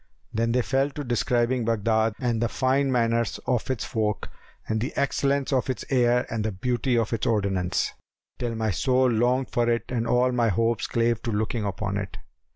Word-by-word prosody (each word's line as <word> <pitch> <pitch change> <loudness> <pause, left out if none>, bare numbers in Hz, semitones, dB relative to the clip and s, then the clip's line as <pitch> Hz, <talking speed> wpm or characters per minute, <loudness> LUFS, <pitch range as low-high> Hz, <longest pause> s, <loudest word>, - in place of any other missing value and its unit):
Then 115 +1 +1
they 125 +1 +2
fell 135 +3 +1
to 145 +1 -6
describing 120 0 +1
Baghdad 110 0 +1
and 120 -3 0
the 120 - +1
fine 135 +2 +1
manners 115 -1 +1
of 125 -1 0
its 130 -5 -1
folk 110 -4 -2 0.4
and 110 0 -1
the 125 - -3
excellence 140 0 +1
of 130 0 +1
its 130 - -3
air 125 -2 +3
and 110 -2 -1
the 110 - -1
beauty 120 +5 0
of 115 0 0
its 115 - -1
ordinance, 100 -5 0 0.5
till 120 -2 -2
my 110 -1 0
soul 130 +7 +2
longed 125 +3 +1
for 120 0 +1
it 115 -2 +1
and 115 -2 -1
all 125 +1 +3
my 120 -2 +2
hopes 115 +2 +1
clave 115 -1 +1
to 115 - -3
looking 110 +1 -1
upon 100 0 -2
it. 100 -1 -5
115 Hz, 190 wpm, -25 LUFS, 110-125 Hz, 0.5 s, air